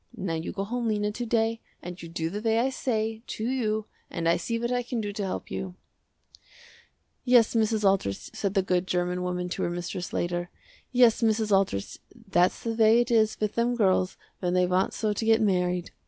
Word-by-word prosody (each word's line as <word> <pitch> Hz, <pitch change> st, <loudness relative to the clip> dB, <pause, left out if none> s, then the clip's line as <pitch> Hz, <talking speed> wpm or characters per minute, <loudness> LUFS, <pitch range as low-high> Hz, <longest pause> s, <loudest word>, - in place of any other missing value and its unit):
Now 185 Hz, -5 st, -2 dB
you 160 Hz, +1 st, -3 dB
go 195 Hz, -, -3 dB
home 235 Hz, +3 st, -2 dB
Lena 210 Hz, -1 st, 0 dB
to 240 Hz, +3 st, -4 dB
day 225 Hz, 0 st, +1 dB, 0.2 s
and 180 Hz, +1 st, -7 dB
you 165 Hz, -, -8 dB
do 165 Hz, 0 st, -3 dB
the 205 Hz, +2 st, -4 dB
way 225 Hz, 0 st, +2 dB
I 255 Hz, +3 st, +2 dB
say, 220 Hz, -4 st, -2 dB
to 220 Hz, -, -3 dB
you, 220 Hz, -4 st, -1 dB, 0.2 s
and 165 Hz, 0 st, -2 dB
I 170 Hz, -, +4 dB
see 230 Hz, +7 st, -2 dB
what 235 Hz, +1 st, -2 dB
I 245 Hz, 0 st, +1 dB
can 245 Hz, -1 st, -4 dB
do 205 Hz, -2 st, -3 dB
to 205 Hz, -, -3 dB
help 190 Hz, -, -4 dB
you." 185 Hz, -2 st, -4 dB, 1.5 s
"Yes 245 Hz, -3 st, +5 dB
Mrs. 220 Hz, -2 st, +2 dB
Aldrich" 190 Hz, -, 0 dB
said 200 Hz, 0 st, -2 dB
the 195 Hz, -, +3 dB
good 180 Hz, -1 st, 0 dB
german 180 Hz, 0 st, -1 dB
woman 180 Hz, 0 st, -2 dB
to -, -, -4 dB
her -, -, 0 dB
mistress 175 Hz, +1 st, -4 dB
later, 175 Hz, 0 st, -2 dB, 0.4 s
"Yes 245 Hz, -3 st, +5 dB
Mrs. 220 Hz, -1 st, +1 dB
Aldrich 185 Hz, -, -1 dB, 0.2 s
that's 195 Hz, -6 st, +1 dB
the 230 Hz, -, -1 dB
way 225 Hz, +1 st, +5 dB
it 240 Hz, +1 st, 0 dB
is 220 Hz, -2 st, +3 dB
with 215 Hz, -1 st, -1 dB
them 235 Hz, +1 st, +1 dB
girls 190 Hz, -4 st, +2 dB, 0.2 s
when 180 Hz, -1 st, -1 dB
they 180 Hz, 0 st, +4 dB
want 185 Hz, +1 st, +1 dB
so 215 Hz, -2 st, 0 dB
to 205 Hz, -, -3 dB
get 225 Hz, 0 st, +4 dB
married. 180 Hz, -4 st, 0 dB
210 Hz, 210 wpm, -27 LUFS, 180-225 Hz, 1.5 s, Yes